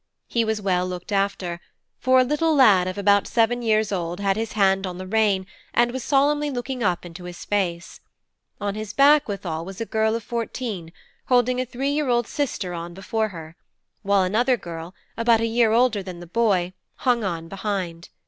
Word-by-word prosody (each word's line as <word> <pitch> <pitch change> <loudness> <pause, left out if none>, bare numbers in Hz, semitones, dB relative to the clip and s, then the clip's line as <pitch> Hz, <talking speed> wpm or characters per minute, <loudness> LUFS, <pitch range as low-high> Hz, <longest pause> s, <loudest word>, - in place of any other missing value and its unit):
He 235 - 0
was 220 -1 -1
well 180 -2 +1
looked 180 +2 -7
after; 195 -3 -1 0.4
for 255 0 +4
a - - +4
little 300 +4 +1
lad 205 -10 +6
of 185 +1 -4
about 200 0 +3
seven 240 +1 +2
years 215 -2 +1
old 175 -2 -3
had 195 -1 +1
his 225 0 -3
hand 195 -2 +2
on 180 -1 -6
the 185 - -6
rein 200 -2 +1 0.3
and 240 0 +3
was 260 0 -4
solemnly 290 +2 +2
looking 255 -1 -4
up 180 -4 0
into 175 +1 -10
his 175 -1 -8
face; 180 -4 -2 0.6
on 205 -1 -2
his 215 0 -6
back, 285 +1 +5
withal, 175 -6 -4
was 190 +2 -9
a 230 - -2
girl 220 0 +1
of 230 - -4
fourteen, 230 -7 -4 0.4
holding 250 0 +3
a 255 - -4
three 270 +4 -2
year 295 -2 0
old 240 -1 +2
sister 210 -9 -3
on 170 0 -6
before 220 +3 -1
her; 165 -4 -10 0.5
while 200 -1 +3
another 240 +7 +2
girl, 170 -1 -8 0.2
about 230 0 +4
a 230 - +1
year 230 0 +2
older 230 -2 +3
than 185 -2 -8
the 175 - -9
boy, 185 -2 +1 0.2
hung 245 -3 +1
on 165 -4 -3
behind. 185 -3 -4
205 Hz, 195 wpm, -23 LUFS, 185-240 Hz, 0.6 s, lad